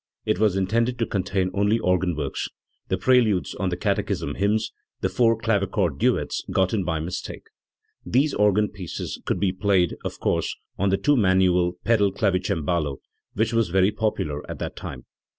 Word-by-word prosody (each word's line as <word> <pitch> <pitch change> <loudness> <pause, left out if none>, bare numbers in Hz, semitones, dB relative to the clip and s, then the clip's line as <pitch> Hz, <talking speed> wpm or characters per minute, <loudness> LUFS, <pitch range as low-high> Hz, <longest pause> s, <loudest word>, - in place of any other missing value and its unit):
It - - 0
was 105 -3 +3
intended 115 +6 +1
to 115 - 0
contain 95 -2 -1
only 100 +2 +2
organ 90 -4 +1
works, 70 -3 -3 0.4
the 95 - 0
preludes 110 -2 +3
on 95 -2 -2
the 90 - -3
catechism 95 -6 -1
hymns; 105 +4 0 0.3
the - - +1
four 115 -2 +3
clavichord 100 -8 0
duets - - +1
got 95 +1 +1
in 105 -4 +1
by 80 -3 -1
mistake. 85 +3 -5 0.6
These 140 +5 +2
organ 105 0 +3
pieces 95 -5 -6
could - - -1
be 95 0 +2
played, 95 -3 +2
of - - -5
course, - - 0 0.2
on 100 +1 +2
the 95 - +2
two 145 +6 +3
manual 95 -5 +3
pedal 105 -4 +3
clavicembalo, 90 - 0 0.4
which 110 +2 0
was 115 -4 +2
very 95 +3 +3
popular 105 -9 -2
at - - -5
that - - -5
time. 65 -3 -8
95 Hz, 170 wpm, -24 LUFS, 90-110 Hz, 0.6 s, was